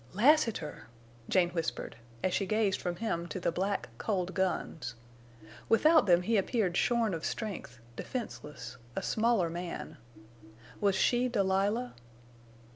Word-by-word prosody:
"Lassiter!" 225 - +2 0.4
Jane 175 -2 +3
whispered, 165 -2 -3 0.3
as 185 - +1
she 195 - 0
gazed 215 -1 +1
from 175 -1 -2
him 170 -4 -2
to 185 - -5
the 170 - 0
black, 195 0 -1
cold 185 -3 -1
guns. 160 -9 -2 0.7
Without 310 +4 +5
them 175 -1 +5
he 225 +4 +2
appeared 195 -2 +1
shorn 230 -1 +2
of 165 -1 -4
strength, 165 - -4 0.2
defenseless, 150 - -6 0.2
a - - -2
smaller 225 -5 +2
man. 170 +1 -5 0.8
Was 200 -2 +2
she 245 +5 +3
Delilah? 205 +2 +1
190 Hz, 125 wpm, -31 LUFS, 175-225 Hz, 0.8 s, Without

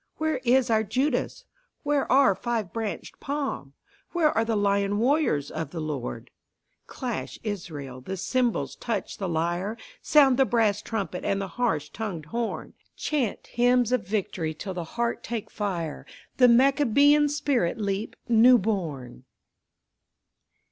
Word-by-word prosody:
Where 315 -3 0
is 250 -1 +3
our 220 -1 +4
Judas? 250 +5 -1 0.4
Where 290 -2 0
our 265 -5 +6
five 225 -2 -3
branched 225 -3 -5
palm? 275 - -4 0.4
Where 325 -3 +3
are 225 - +3
the 225 0 -1
lion 200 0 +1
warriors 235 - +1
of 160 -3 -4
the 165 - -6
Lord? 135 -7 -5 0.6
Clash, 250 -4 -5
Israel, 150 - -6
the 190 +9 -5
cymbals, 235 - 0
touch 235 -2 -4
the 190 -3 -2
lyre, 175 +6 -1 0.2
Sound 275 -4 +5
the 270 - +5
brass 220 -4 +2
trumpet 200 -6 -4
and 195 - 0
the 195 -1 -4
harsh 160 -12 -1
tongued 190 -9 -5
horn, 230 +8 -4 0.2
Chant 270 -9 -2
hymns 245 0 +2
of 250 -8 0
victory 185 -6 -2
till 190 +4 -5
the 175 -2 -4
heart 235 0 -1
take 230 -3 -5
fire, 175 -7 -4 0.3
The 250 - +7
Maccabean 285 +3 +5
spirit 280 - 0
leap 200 0 -2
new 240 +2 +7
born! 165 - -3
220 Hz, 140 wpm, -26 LUFS, 180-250 Hz, 0.6 s, The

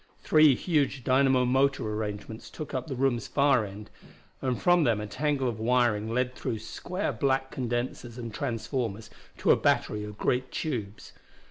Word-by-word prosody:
Three 155 -3 +6
huge 145 -4 0
dynamo 130 0 +3
motor 135 -1 +2
arrangements 105 +1 -5
took 155 - -8
up 130 -2 -3
the 135 - -4
room's 125 -3 0
far 140 -4 +3
end, 100 +2 -10 0.5
and 130 -2 -1
from 175 -2 +4
them 115 -6 +2
a 105 - -4
tangle 135 +4 -1
of 115 -3 -3
wiring 115 -2 +2
led 125 +1 0
through 115 - -3
square 175 - -4
black 135 +2 0
condensers 120 -1 -3
and 115 -3 -6
transformers 115 -4 -3 0.3
to - - +3
a - - +7
battery 105 0 +1
of 105 0 -8
great 125 +3 0
tubes. 110 -10 -4
125 Hz, 160 wpm, -28 LUFS, 110-135 Hz, 0.5 s, a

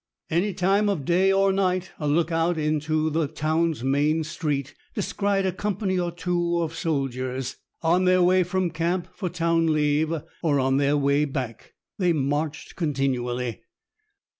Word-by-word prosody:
Any 180 +4 +1
time 195 +4 +2
of 165 -9 -2
day 185 +4 +3
or 195 0 +3
night, 185 -1 0
a 150 - -2
look 160 +3 +2
out 165 +1 +1
into 155 +1 0
the 160 0 +1
town's 155 -1 0
main 145 +4 +2
street 150 -4 -3 0.2
descried 200 -1 0
a 190 - +1
company 190 0 -1
or 175 -1 -1
two 175 0 -1
of 165 -1 -4
soldiers, 135 -6 -2 0.3
on 175 +3 +3
their 185 0 +4
way 185 +1 +4
from 180 0 0
camp 170 +3 -1
for 185 -4 -3
town 165 -1 +1
leave, 150 +1 +2 0.3
or 150 -5 +2
on 135 0 +2
their 140 +1 +2
way 140 +1 +2
back. 125 -4 -5 0.3
They 180 -3 +3
marched 150 +1 -2
continually. 125 -6 -1
165 Hz, 155 wpm, -25 LUFS, 145-180 Hz, 0.3 s, their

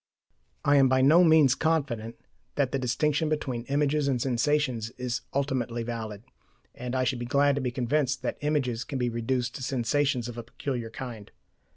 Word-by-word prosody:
I 145 0 +5
am 135 -1 +5
by 130 0 +3
no 160 +6 +7
means 160 -6 +6
confident 135 -8 -1 0.4
that 140 -3 +1
the 135 - -1
distinction 150 +5 0
between 130 -6 -2
images 145 +1 +1
and 130 -3 +1
sensations 130 -2 0
is 125 -1 -3
ultimately 130 -4 -1
valid, 110 -3 -5 0.5
and 125 +1 -5
I 130 - +2
should 125 0 -1
be 120 - -4
glad 140 +3 +3
to 140 - -2
be 125 - -1
convinced 130 +2 0
that - - -3
images 135 -6 0
can 135 - -5
be 125 -1 0
reduced 120 +1 -1
to - - -10
sensations 130 0 0
of 120 -1 -7
a - - -5
peculiar 120 0 -4
kind. 115 -3 -8
130 Hz, 180 wpm, -27 LUFS, 120-145 Hz, 0.5 s, no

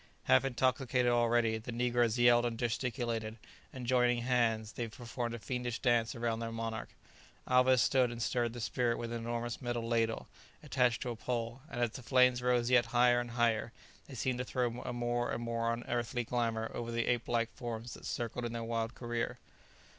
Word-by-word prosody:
Half - - +4
intoxicated 125 -1 +1
already, 120 -1 +2
the 120 +3 -7
negroes 120 -1 +1
yelled 120 0 +6
and 120 -1 -2
gesticulated; 115 -2 -2 0.3
and 130 -2 -7
joining 120 -1 +3
hands, 115 -3 +1
they 120 - -4
performed 120 +1 -5
a - - -5
fiendish 125 0 -3
dance 120 -3 +2
around 115 -1 -1
their 115 0 -4
monarch. 115 0 -4 0.6
Alvez 125 0 +5
stood 130 -2 +3
and 120 -1 -6
stirred 120 0 0
the 120 - -6
spirit 120 +1 0
with 115 0 -4
an 120 - -3
enormous 120 +1 -3
metal 120 -2 -2
ladle, 115 -1 0 0.4
attached 125 -5 +1
to 125 - -3
a - - -4
pole, 120 +2 -3
and 120 - -5
as 120 -2 +1
the 125 - -8
flames 125 0 +4
rose 125 -1 +2
yet 120 -2 +5
higher 120 +1 +4
and 120 0 -4
higher 115 -1 +1 0.3
they 135 - -9
seemed 125 +1 -1
to - - 0
throw 125 -1 -2
a - - -4
more 120 0 -1
and 120 - -3
more 115 0 0
unearthly 120 +1 -2
glamour 115 -1 -1
over 115 0 -4
the 115 0 0
ape 120 -1 0
like 115 -1 0
forms 120 -1 -5
that - - -11
circled 120 +1 -3
in 120 -1 -3
their 115 0 -3
wild 115 0 -2
career. 120 -1 -3
120 Hz, 190 wpm, -33 LUFS, 115-125 Hz, 0.6 s, yelled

